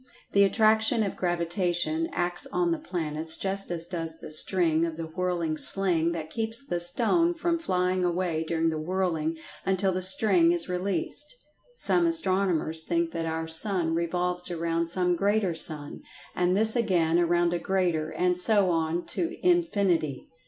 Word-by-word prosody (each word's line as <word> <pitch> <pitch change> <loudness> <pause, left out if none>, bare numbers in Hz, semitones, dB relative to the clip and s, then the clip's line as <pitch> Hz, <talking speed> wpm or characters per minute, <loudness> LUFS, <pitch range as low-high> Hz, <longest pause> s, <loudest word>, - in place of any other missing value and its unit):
The 200 - +4
Attraction 220 +2 +3
of 200 - -4
Gravitation 175 - -1
acts 175 +7 -2
on 345 +5 -1
the 330 - -1
planets 160 - -2
just 195 0 -1
as 170 -1 -3
does 165 -2 -4
the 160 - -8
string 165 0 +2
of 165 -1 -3
the 165 - -5
whirling 170 -1 -3
sling 170 -2 +3
that 160 -2 -6
keeps 225 +5 -1
the 175 -9 -2
stone 240 - +3
from 335 0 -1
flying 185 - -1
away 175 -2 -1
during 165 0 0
the 160 -1 -3
whirling 165 -2 -2 0.3
until 190 0 0
the 185 0 -3
string 185 -2 +5
is 175 -1 0
released. 185 - -2 0.4
Some 350 -7 +3
astronomers 185 - +1
think 170 0 -1
that 165 -1 -4
our 160 0 -3
sun 165 0 0
revolves 180 +2 -2
around 170 -1 -2
some 180 +1 0
greater 200 0 0
sun, 150 -2 -2 0.3
and 180 +1 +1
this 220 +2 +3
again 175 -8 +1
around 175 0 +1
a 175 - -1
greater, 175 -5 -1
and 180 0 0
so 195 0 +2
on 165 +1 -1
to 335 - -3
infinity. 200 - 0
180 Hz, 160 wpm, -26 LUFS, 165-195 Hz, 0.4 s, string